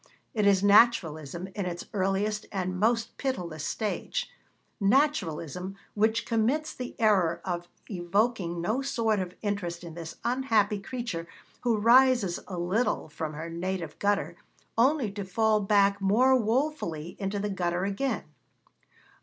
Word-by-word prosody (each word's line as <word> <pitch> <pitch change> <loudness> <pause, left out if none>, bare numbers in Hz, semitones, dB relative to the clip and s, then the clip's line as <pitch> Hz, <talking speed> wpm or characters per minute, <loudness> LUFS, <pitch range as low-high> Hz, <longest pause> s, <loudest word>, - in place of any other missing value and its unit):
It 210 -4 +2
is 195 -1 +4
Naturalism 180 - +3
in 200 -3 -3
its 175 -1 -5
earliest 205 +2 0
and 185 -2 -2
most 230 +2 +1
pitiless 175 - -3
stage 485 - -2 0.5
Naturalism 195 - +1 0.2
which 220 +2 +1
commits 245 +7 0
the 250 -1 -7
error 190 -7 +3
of 175 -1 -3 0.2
evoking 185 -1 0
no 220 +9 0
sort 225 -5 0
of 180 -1 -4
interest 180 -4 -3
in 170 -2 -8
this 165 -1 -7
unhappy 225 -5 +2
creature 200 -6 -5 0.3
who 235 -3 +2
rises 235 -4 +5
a 185 - -5
little 180 +1 0
from 155 +1 -5
her 160 +3 -6
native 170 -2 -4
gutter, 205 0 0 0.4
only 255 -2 +3
to 200 0 -5
fall 215 +3 +2
back 200 0 +3
more 240 +7 +4
woefully 225 - -1
into 200 0 -2
the 205 +1 -2
gutter 180 -1 -1
again. 225 +7 -1
200 Hz, 135 wpm, -28 LUFS, 175-230 Hz, 0.5 s, rises